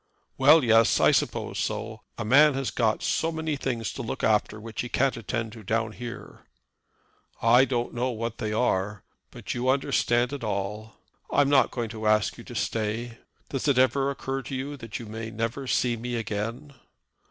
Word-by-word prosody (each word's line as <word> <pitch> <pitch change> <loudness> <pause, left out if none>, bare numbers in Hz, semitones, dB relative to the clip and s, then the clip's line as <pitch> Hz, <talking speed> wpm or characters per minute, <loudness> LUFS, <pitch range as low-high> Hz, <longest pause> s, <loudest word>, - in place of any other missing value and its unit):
"Well, 145 +3 +6
yes; 115 -1 +4
I - - +5
suppose - - -1
so. - - -3 0.2
A - - -3
man 145 +5 +6
has 135 -1 -2
got 110 -3 0
so 165 - 0
many 160 -1 -2
things 120 -5 -3
to - - -5
look 115 - -5
after 105 0 +2
which 115 +1 -5
he 120 - -5
can't 135 - +1
attend 115 0 -3
to 110 - -11
down 110 +2 0
here." 120 +1 -9 1.0
"I 120 +3 +5
don't 120 -2 -2
know 125 +2 -1
what 115 -1 -4
they 110 -2 -2
are, 105 -3 0 0.3
but - - -6
you 125 +1 -1
understand 130 -2 +1
it 140 -4 -5
all. 105 +1 -3 0.4
I'm 145 -1 +3
not 140 -2 +5
going 120 -3 -3
to 110 -1 -4
ask 105 -2 +2
you - - -9
to - - -9
stay. 115 +2 -2 0.3
Does 135 +1 -2
it 140 -3 +3
ever 135 +2 +3
occur 135 -1 -3
to 135 +2 -6
you 140 +3 -4
that 115 -5 -7
you 115 - -8
may 110 +1 -6
never 115 +4 -3
see 120 -1 +1
me 120 +2 -4
again?" 115 +5 -4
120 Hz, 185 wpm, -26 LUFS, 110-135 Hz, 1.0 s, Well